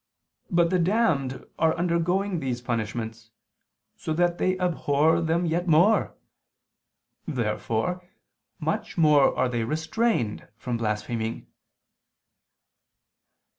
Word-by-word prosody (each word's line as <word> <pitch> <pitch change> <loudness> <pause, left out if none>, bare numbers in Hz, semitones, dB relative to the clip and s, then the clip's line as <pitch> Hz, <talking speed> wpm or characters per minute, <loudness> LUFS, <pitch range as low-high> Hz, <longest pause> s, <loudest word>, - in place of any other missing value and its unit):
But 170 -1 +2
the 185 - +2
damned 170 - +1
are 160 -1 +3
undergoing 175 +2 0
these 130 -4 -3
punishments, 115 -1 -4 0.7
so 160 - -4
that 175 +1 +1
they 185 0 +1
abhor 160 -2 +2
them 165 +2 +1
yet 170 +2 -1
more. 175 +7 +4 1.1
Therefore, 125 +7 -2 0.5
much - - -3
more 150 -4 +4
are 130 - +2
they 120 -2 -1
restrained 160 - -1
from 120 +2 -3
blaspheming. 110 +1 -3
160 Hz, 95 wpm, -26 LUFS, 120-175 Hz, 1.1 s, more